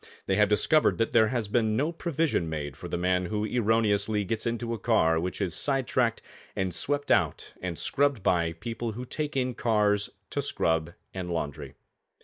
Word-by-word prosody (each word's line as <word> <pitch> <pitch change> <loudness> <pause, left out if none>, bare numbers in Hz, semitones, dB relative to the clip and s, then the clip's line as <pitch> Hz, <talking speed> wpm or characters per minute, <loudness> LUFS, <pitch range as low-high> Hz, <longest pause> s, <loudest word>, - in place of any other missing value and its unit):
They 95 - +1
have 105 -1 +4
discovered 155 +9 +3
that 115 - 0
there 110 -2 +5
has 120 -3 -1
been 110 0 +1
no 150 +5 +1
provision 160 - -1
made 75 -3 -4
for - - -8
the - - -2
man 90 0 +1
who 105 +1 -1
erroneously 110 -2 +1
gets 110 +4 -2
into 115 0 -2
a 115 - -4
car 80 -7 +3
which 90 +2 -3
is 95 -5 -1
side 135 +3 0
tracked 120 -2 0 0.3
and 95 -2 -1
swept 145 - -1
out 85 -7 +1
and 90 -3 -4
scrubbed 140 -7 +1
by 85 -2 +2
people 115 +5 -4
who 125 +4 -6
take 150 +2 -3
in 130 -1 0
cars 105 -4 +1 0.2
to - - -1
scrub 80 +1 0 0.2
and 95 -2 -4
laundry. 80 -4 -4
110 Hz, 185 wpm, -28 LUFS, 90-120 Hz, 0.3 s, there